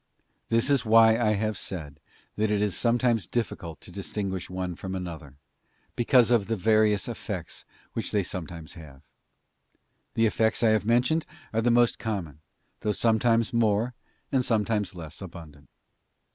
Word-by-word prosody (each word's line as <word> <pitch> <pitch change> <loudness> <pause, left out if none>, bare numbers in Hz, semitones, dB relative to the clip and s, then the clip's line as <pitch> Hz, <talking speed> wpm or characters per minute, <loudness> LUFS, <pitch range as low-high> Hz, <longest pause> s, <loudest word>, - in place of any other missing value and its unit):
This 115 +4 +2
is 140 -3 +3
why 115 0 +6
I 110 -2 +2
bave 110 +1 -1
said 80 -7 -7 0.4
that 110 0 +1
it 105 -1 +1
is 105 -2 0
sometimes 120 -4 +1
difficult 85 - -3
to - - -12
distinguish 100 -1 -4
one 90 -1 -3
from 95 +2 -6
another, 80 -7 -7 0.6
because 120 0 +4
of 115 -5 +3
the 115 - 0
various 110 0 +3
effects 100 -7 -6 0.3
which - - -3
they 105 -2 +1
sometimes 85 -3 -7
have. 75 -6 -13 1.1
The 115 - +3
effects 110 +1 +1
I 115 - +5
have 110 -1 +2
mentioned 125 +7 +2 0.3
are 115 - +1
the 120 - +2
most 120 0 +3
common, 95 -9 -4 0.4
though 105 - 0
sometimes 115 +2 +2
more, 115 +1 +2 0.4
and 130 -2 +2
sometimes 105 -4 0
less 80 -1 -9
abundant. 80 -6 -11
105 Hz, 150 wpm, -27 LUFS, 90-115 Hz, 1.1 s, why